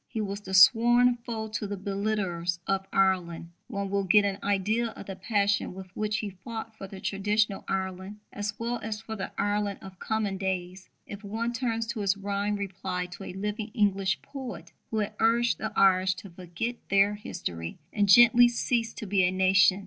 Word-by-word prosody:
He 225 Hz, -, -5 dB
was 200 Hz, -1 st, -3 dB
the 190 Hz, -1 st, -4 dB
sworn 240 Hz, +4 st, +6 dB
foe 235 Hz, -2 st, -5 dB
of 215 Hz, -1 st, -4 dB
the 205 Hz, -, -3 dB
belittlers 195 Hz, -3 st, -2 dB
of 195 Hz, 0 st, -1 dB
Ireland. 175 Hz, -3 st, +1 dB, 0.2 s
One 200 Hz, -5 st, -4 dB
will 200 Hz, 0 st, +1 dB
get 205 Hz, +2 st, +5 dB
an 200 Hz, 0 st, -2 dB
idea 205 Hz, +4 st, +1 dB
of 225 Hz, -, -9 dB
the 195 Hz, -, -6 dB
passion 200 Hz, -1 st, 0 dB
with 190 Hz, -1 st, -10 dB
which 215 Hz, 0 st, -1 dB
he 205 Hz, -2 st, -4 dB
fought 220 Hz, +4 st, -8 dB
for 195 Hz, -, -8 dB
the 190 Hz, 0 st, -10 dB
traditional 205 Hz, +1 st, 0 dB
Ireland, 190 Hz, +1 st, -3 dB, 0.2 s
as 205 Hz, 0 st, -4 dB
well 235 Hz, +1 st, -2 dB
as 215 Hz, -1 st, -4 dB
for 220 Hz, 0 st, -7 dB
the 195 Hz, -, -5 dB
Ireland 205 Hz, -1 st, 0 dB
of 190 Hz, -1 st, -11 dB
coming 210 Hz, -3 st, -2 dB
days, 185 Hz, -1 st, -3 dB, 0.2 s
if 205 Hz, +1 st, -9 dB
one 225 Hz, +4 st, -3 dB
turns 230 Hz, -2 st, -1 dB
to 225 Hz, -1 st, -4 dB
his 200 Hz, -1 st, +1 dB
rhymed 200 Hz, +1 st, -1 dB
reply 190 Hz, -2 st, -3 dB
to 195 Hz, -, -9 dB
a -, -, -7 dB
living 210 Hz, +3 st, -4 dB
English 195 Hz, -2 st, +1 dB
poet 240 Hz, -, -8 dB, 0.2 s
who 220 Hz, -, -3 dB
had 210 Hz, -1 st, -1 dB
urged 235 Hz, +2 st, +2 dB
the 220 Hz, -, -3 dB
Irish 185 Hz, -1 st, +4 dB
to 195 Hz, 0 st, -11 dB
forget 180 Hz, +7 st, -5 dB
their 200 Hz, +1 st, +4 dB
history 85 Hz, -, -6 dB, 0.2 s
and 205 Hz, -2 st, +1 dB
gently 240 Hz, +3 st, +8 dB
cease 235 Hz, -1 st, -1 dB
to -, -, -6 dB
be 195 Hz, -1 st, +2 dB
a 180 Hz, -, +4 dB
nation. 190 Hz, 0 st, +4 dB
200 Hz, 190 wpm, -28 LUFS, 190-220 Hz, 0.2 s, gently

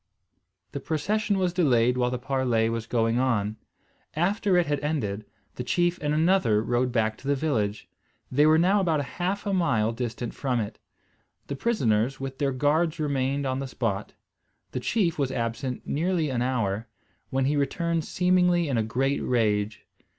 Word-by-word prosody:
The 140 Hz, -, -4 dB
procession 200 Hz, +9 st, 0 dB
was 180 Hz, -2 st, 0 dB
delayed 125 Hz, -8 st, +3 dB
while 125 Hz, -1 st, +1 dB
the 125 Hz, -, -2 dB
parley 125 Hz, -3 st, 0 dB
was 115 Hz, 0 st, -3 dB
going 115 Hz, 0 st, +1 dB
on. 110 Hz, -5 st, 0 dB, 0.6 s
After 190 Hz, +3 st, +2 dB
it 175 Hz, -, +3 dB
had 145 Hz, -1 st, -1 dB
ended, 110 Hz, -9 st, -2 dB, 0.3 s
the 125 Hz, -, -3 dB
chief 175 Hz, +7 st, +1 dB
and 150 Hz, 0 st, 0 dB
another 155 Hz, -, +3 dB
rode 125 Hz, +2 st, 0 dB
back 110 Hz, -2 st, 0 dB
to 140 Hz, -, -10 dB
the 140 Hz, -, +3 dB
village; 110 Hz, -8 st, -1 dB, 0.4 s
they 145 Hz, +4 st, +4 dB
were 155 Hz, 0 st, +6 dB
now 190 Hz, +5 st, +3 dB
about 160 Hz, -6 st, +1 dB
half 185 Hz, +8 st, -3 dB
a 200 Hz, -, 0 dB
mile 115 Hz, -, +2 dB
distant 120 Hz, 0 st, -4 dB
from 130 Hz, -4 st, -1 dB
it. 105 Hz, -2 st, -5 dB, 0.7 s
The 140 Hz, -, -4 dB
prisoners, 135 Hz, -, +1 dB
with 135 Hz, 0 st, -6 dB
their 140 Hz, -1 st, +1 dB
guards 155 Hz, +5 st, +1 dB
remained 140 Hz, -1 st, 0 dB
upon 130 Hz, 0 st, -1 dB
the 135 Hz, -, -4 dB
spot. 110 Hz, -6 st, -3 dB, 0.6 s
The -, -, -3 dB
chief 170 Hz, -, 0 dB
was 135 Hz, -2 st, 0 dB
absent 120 Hz, +1 st, -3 dB
nearly 165 Hz, 0 st, 0 dB
an 120 Hz, -2 st, -1 dB
hour, 115 Hz, -4 st, -1 dB, 0.4 s
when 135 Hz, 0 st, 0 dB
he 145 Hz, +2 st, +1 dB
returned 165 Hz, +4 st, 0 dB
seemingly 180 Hz, 0 st, +2 dB
in 125 Hz, -4 st, +1 dB
a -, -, +1 dB
great 135 Hz, +5 st, 0 dB
rage. 105 Hz, -3 st, 0 dB
135 Hz, 170 wpm, -26 LUFS, 115-165 Hz, 0.7 s, were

